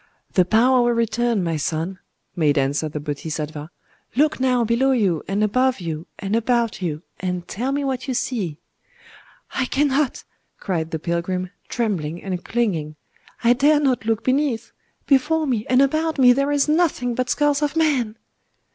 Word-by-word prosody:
"The 185 - +4
power 245 +6 +4
will 240 0 +2
return, 230 -2 +1
my 165 -2 -1
son," 165 +5 -3 0.4
made 150 -3 +2
answer 140 +3 0
the 150 - -5
Bodhisattva…. 150 +1 -5 0.5
"Look 300 +2 +2
now 250 -2 +2
below 240 +4 +2
you 195 -10 +1
and 200 +2 0
above 255 +4 +2
you 165 -1 -5
and 200 +2 -2
about 230 -2 0
you, 160 -2 -3 0.2
and 180 -1 -3
tell 250 +6 -2
me 285 +1 -1
what 265 -1 -2
you 260 - -1
see." 195 - -2 1.0
"I 260 - 0
cannot," 280 +1 0 0.3
cried 165 -5 -2
the 160 - -2
pilgrim, 180 +3 -2 0.2
trembling 175 -9 -2
and 185 -2 -4
clinging; 175 -11 -1 0.5
"I 235 +1 +6
dare 290 +4 +4
not 265 -6 +1
look 225 0 0
beneath! 255 -3 0 0.3
Before 305 +3 +2
me 240 -6 -1
and 255 +2 +5
about 315 +3 0
me 250 -2 +7
there 275 +3 0
is 290 0 +2
nothing 300 -6 +1
but 255 +1 -2
skulls 290 +2 +2
of 295 +1 0
men." 270 -9 +1
230 Hz, 165 wpm, -22 LUFS, 175-265 Hz, 1.0 s, me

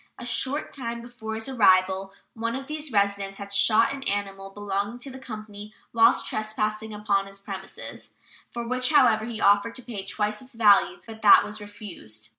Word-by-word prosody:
A 240 - -8
short 265 +4 0
time 235 -3 -5
before 235 -2 -7
his 220 +2 -4
arrival 190 -5 +3 0.2
one 230 +1 -3
of 270 0 -5
these 305 0 -5
residents 200 -2 0
had 200 0 -8
shot 220 +4 +5
an 275 - -7
animal 195 -1 -3
belonging 205 +3 -3
to 265 +2 -6
the 265 - -9
company 215 -4 -9 0.2
whilst 225 -1 +4
trespassing 215 0 -2
upon 205 -2 0
his 195 0 -11
premises, 195 -1 -9 0.4
for 235 -1 -5
which, 255 +1 0
however, 250 -8 +4
he 230 -2 -5
offered 205 +3 +3
to 255 - -8
pay 225 -5 -6
twice 210 +1 -2
its 260 -1 -15
value, 210 -3 +4
but 220 -1 -11
that 205 - +8
was 210 +1 -6
refused. 190 - -8
215 Hz, 180 wpm, -25 LUFS, 200-235 Hz, 0.4 s, that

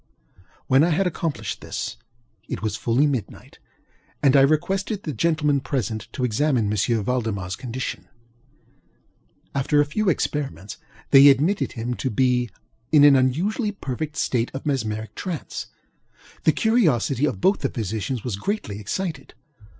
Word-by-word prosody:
When 135 +3 +4
I 170 - +3
had 175 +4 +1
accomplished 165 -3 -3
this, - - -4 0.5
it - - -5
was 110 -2 -1
fully 120 +5 +2
midnight, 130 -8 -4 0.6
and 140 -1 +5
I 135 - +7
requested 190 +8 +1
the 150 - -4
gentlemen 155 -3 +1
present 120 -5 -3
to 130 - -3
examine 125 0 +1
M. 100 - -1
ValdemarŌĆÖs 105 -3 -1
condition. 125 0 -5 1.5
After 140 +2 +1
a 145 - +4
few 195 +8 0
experiments, 135 - -2 0.3
they 140 0 +9
admitted 160 +10 +2
him 120 +1 -3
to 130 - -2
be 125 0 +1 0.4
an 150 -2 +6
unusually 185 - +1
perfect 150 -3 -5
state 120 -1 0
of 135 - -6
mesmeric 110 -6 -2
trance. 175 +2 -5 0.8
The - - +6
curiosity 150 - +2
of 150 - -2
both 190 +3 +3
the 135 - -1
physicians 110 +2 -3
was 110 -6 -3
greatly 105 - -3
excited. 165 - -4
135 Hz, 135 wpm, -23 LUFS, 115-155 Hz, 1.5 s, they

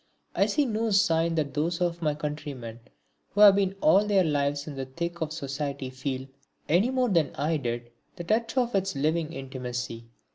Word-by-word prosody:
I - - +2
see 295 - +2
no 225 -1 -1
sign 170 -5 +3
that 150 -3 -1
those 165 +3 -1
of 175 -1 -1
my 150 -2 +1
countrymen 145 -6 -6 0.5
who 205 - 0
have 205 -2 +9
been 195 -1 +1
all 190 +6 +5
their 205 -2 +3
lives 145 -2 0
in 150 - -6
the 135 -1 -5
thick 170 +5 -5
of 155 -1 -2
society 140 -3 -4
feel, 130 0 -4 0.4
any 180 +10 +3
more 255 -2 +1
than 165 -7 +1
I 155 +3 0
did, 120 -3 -4 0.2
the 175 - -6
touch 225 +7 0
of 245 -1 +2
its 195 -3 0
living 155 +3 0
intimacy. 125 -4 -5
155 Hz, 185 wpm, -27 LUFS, 140-190 Hz, 0.5 s, have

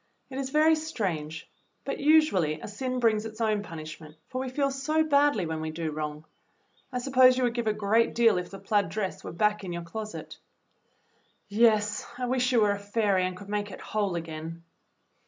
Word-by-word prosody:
It 265 - -4
is 265 -1 -3
very 305 +3 +5
strange, 190 - -3 0.4
but - - -3
usually 280 - +3
a - - -7
sin 255 +4 -3
brings 220 -3 +2
its 220 0 -8
own 215 -2 +1
punishment, 155 -3 -9
for 255 0 -3
we 260 - -3
feel 275 +2 0
so 310 +4 +1
badly 285 - +3
when 160 -1 -3
we 160 - -3
do 160 0 -3
wrong. 150 0 -5 0.7
I 250 - -2
suppose 255 0 +5
you 260 - +1
would 240 -1 +1
give 235 -2 -2
a - - +4
great 215 +2 +2
deal 230 -5 +4
if 180 - -6
the 195 - -8
plaid 205 -2 +1
dress 195 +1 -3
were - - -6
back 210 +4 +1
in 185 - -5
your 170 0 -4
closet." 215 +6 -7 1.1
"Yes, 210 -1 +3
I 250 - -2
wish 255 0 +1
you 240 -3 +4
were 210 -1 +4
a 200 - -2
fairy 200 -2 +1
and 185 0 -4
could 200 - -11
make 205 0 -2
it 185 - -9
whole 205 -4 -2
again!" 165 0 -6
210 Hz, 200 wpm, -28 LUFS, 175-255 Hz, 1.1 s, very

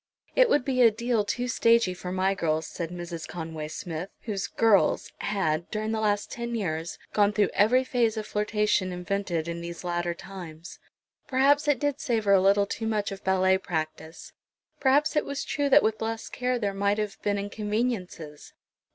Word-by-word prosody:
"It - - +5
would 290 - +2
be 255 -2 +1
a 235 - +8
deal 230 0 0
too 245 +5 -2
stagey 230 -5 +3
for 180 0 -6
my 190 +1 +1
girls," 160 -4 -1
said 165 0 -5
Mrs. 175 -2 -6
Conway 160 -2 -6
Smith, 165 +3 -5
whose 200 -4 -3
"girls" 220 -4 +2
had, 170 -5 -1
during 215 +1 -2
the 220 - -1
last 205 -1 0
ten 235 0 -4
years, 165 -5 -3 0.2
gone 205 -1 +4
through 205 -2 +1
every 245 +6 +4
phase 235 -4 +1
of 215 - -3
flirtation 210 -3 0
invented 180 -2 -2
in 170 0 -4
these 170 +1 -7
latter 175 -1 -1
times. 170 -3 -10 0.5
Perhaps 280 +2 +3
it 290 -2 +3
did 290 +2 -1
savour 220 -7 +2
a 190 - +6
little 200 +1 +4
too 220 +2 -4
much 215 -2 -1
of 195 0 -8
ballet 190 0 +3
practise; 160 - -5 0.5
perhaps 285 +3 +3
it 300 - +3
was 280 0 -4
true 285 -1 -1
that 290 +2 +6
with 220 0 0
less 225 0 -3
care 250 0 -1
there 205 -4 -1
might 200 +1 +1
have 210 0 -4
been 205 0 0
inconveniences. 205 -6 -3
205 Hz, 180 wpm, -27 LUFS, 180-230 Hz, 0.5 s, a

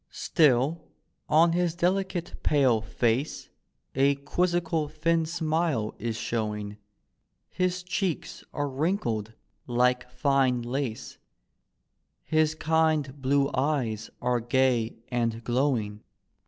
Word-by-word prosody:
Still 150 0 +2 0.5
on 165 +3 +5
his 175 -1 0
delicate 180 0 -1
pale 130 -7 +3
face 120 +5 -1 0.4
A 140 +1 +3
quizzical 165 +1 0
thin 160 +2 0
smile 160 -8 -1
is 115 -1 -3
showing, 105 -3 -3 0.7
His 185 0 -1
cheeks 180 -2 -3
arc 145 -1 -2
wrinkled 125 - -1 0.3
like 125 +1 +1
fine 130 -2 +1
lace, 120 -1 -4 1.0
His 155 0 +2
kind 155 -3 +1
blue 140 +1 +2
eyes 130 -6 -1
are 125 0 +2
gay 120 -1 +1
and 115 -2 -1
glowing. 120 -5 0
140 Hz, 100 wpm, -27 LUFS, 120-160 Hz, 1.0 s, on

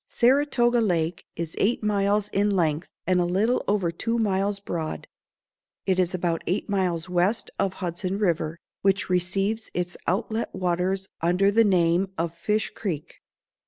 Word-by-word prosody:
Saratoga 245 -2 +3
Lake 170 -5 0
is 165 -1 -4
eight 225 +2 +1
miles 205 0 +1
in 205 +1 +1
length, 170 -4 +1 0.2
and 180 -1 +3
a - - +3
little 195 +8 +1
over 195 -4 +1
two 230 +7 -2
miles 200 -2 0
broad. 170 -5 -4 0.8
It 185 -1 +1
is 185 0 +1
about 170 -2 -1
eight 185 +4 -1
miles 180 -4 0
west 180 +5 +1
of 190 - +1
Hudson 185 +1 -3
River, 170 -5 0 0.2
which 195 -1 +1
receives 195 +5 0
its 175 0 -2
outlet 220 +5 -1
waters 185 +2 0
under 180 +4 +3
the 225 +2 +5
name 185 -1 +2
of 165 0 -1
Fish 210 +6 -1
Creek. 165 -9 -5
190 Hz, 150 wpm, -25 LUFS, 175-205 Hz, 0.8 s, the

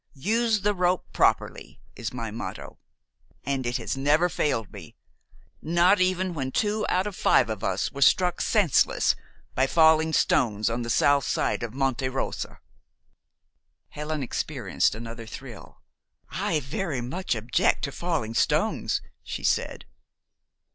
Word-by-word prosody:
'Use 220 - +1
the 205 +1 +1
rope 180 -1 +1
properly,' - - 0 0.2
is 115 0 -5
my 115 -3 -5
motto, 115 +2 -7 0.6
and 135 -3 -2
it 120 +1 0
has 120 - -3
never 150 +6 +2
failed 130 - -1
me, - - -11 0.7
not 175 +4 +3
even 185 0 +1
when 135 -4 -3
two 210 +4 0
out 185 +1 +1
of 205 -2 -5
five 110 - +3
of 110 -3 -5
us 95 +1 -1
were 140 - -8
struck 180 +6 +4
senseless 205 - +3 0.4
by 130 +1 +2
falling 160 +1 +4
stones 115 -8 +2
on 120 +1 -2
the 120 - -4
south 140 +3 +3
side - - 0
of 115 0 -5
Monte 135 -1 0
Rosa." 130 +1 -4 1.3
Helen 150 -1 -4
experienced 120 - -1
another 115 0 -8
thrill. - - -11 0.5
"I 155 -2 -1
very 145 0 -3
much 130 +5 -2
object 115 +2 +1
to 140 - -2
falling 155 -9 -2
stones," - - 0 0.2
she - - -6
said. - - -1
140 Hz, 140 wpm, -26 LUFS, 120-180 Hz, 1.3 s, struck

